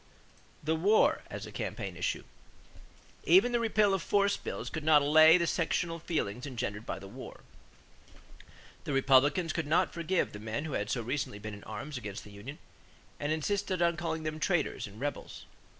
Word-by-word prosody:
=The 155 +2 +1
War 200 +7 +3
as - - -6
a - - -9
Campaign - - -5
Issue.= - - -2 1.0
Even 355 -9 +5
the 240 - +2
repeal 215 -3 +3
of 190 - 0
force 200 +3 +2
bills - - -6
could 160 -3 -4
not 150 -2 +5
allay 155 +3 +7
the 170 - +1
sectional 165 0 -1
feelings 135 - -3
engendered 115 -4 -4
by - - -3
the 95 0 -10
war. - - -10 1.4
The 145 - -2
Republicans 145 +5 +3
could 165 -3 -2
not 155 - +2
forgive 170 +2 -1
the 105 - -7
men 110 +7 -4
who 155 - -5
had 105 +1 -2
so 120 - -1
recently 130 -2 -3
been 110 +1 -7
in 100 - -10
arms 125 +6 -6
against 100 -4 -7
the 105 - -13
union 110 +9 -9 0.6
and 145 +1 -1
insisted 185 +4 -1
on 170 -1 +3
calling 160 -1 -3
them 155 0 -4
"traitors" 160 - 0
and 105 +2 -13
"rebels." 145 +2 -5
155 Hz, 180 wpm, -31 LUFS, 120-170 Hz, 1.4 s, allay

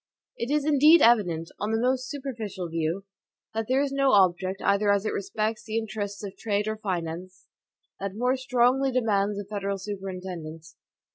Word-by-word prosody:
It 235 - -4
is 295 0 +1
indeed 305 +3 +6
evident, 180 -9 +3
on 210 - -2
the 225 - +1
most 255 +1 0
superficial 225 - -5
view, 165 +4 -2 0.5
that 225 0 -2
there 265 +2 +2
is 280 - -2
no 275 -1 +2
object, 190 -1 +3
either 200 +1 +3
as 200 +1 +1
it - - -1
respects 215 +2 -2
the 220 0 -3
interests 210 -2 -4
of 200 -1 -6
trade 210 -1 -1
or 215 0 -2
finance, 185 -2 -5 0.5
that 195 0 -4
more 250 +3 +1
strongly 260 +1 +2
demands 210 -5 +1
a 205 - -4
federal 200 -1 -3
superintendence. 185 -5 -7
205 Hz, 165 wpm, -26 LUFS, 190-245 Hz, 0.5 s, indeed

